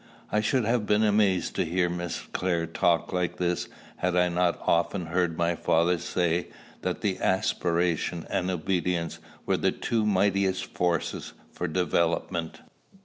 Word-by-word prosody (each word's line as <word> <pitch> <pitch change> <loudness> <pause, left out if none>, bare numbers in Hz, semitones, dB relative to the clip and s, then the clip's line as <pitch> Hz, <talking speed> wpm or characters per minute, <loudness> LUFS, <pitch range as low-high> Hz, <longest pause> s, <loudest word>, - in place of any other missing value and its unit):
I 105 - +2
should 120 +2 +1
have 115 -2 +1
been 105 +1 +3
amazed 105 -3 +2
to - - +3
hear 90 +2 +1
Miss 85 0 -3
Clare 85 -2 0
talk 85 +2 +1
like 90 -1 -1
this, 90 -1 -1 0.3
had 90 0 0
I 90 0 +3
not 90 0 +1
often 85 +2 +1
heard 85 -1 0
my 85 0 +2
father 85 +2 +2
say 85 0 0 0.3
that - - -3 0.2
aspiration 85 -2 0
and 90 0 -1
obedience 90 -1 -1 0.3
were - - +2
the - - +2
two 115 -2 -1
mightiest 100 -2 +2
forces 85 -2 -2 0.2
for 90 - -3
development. 85 0 0
90 Hz, 145 wpm, -27 LUFS, 85-95 Hz, 0.3 s, been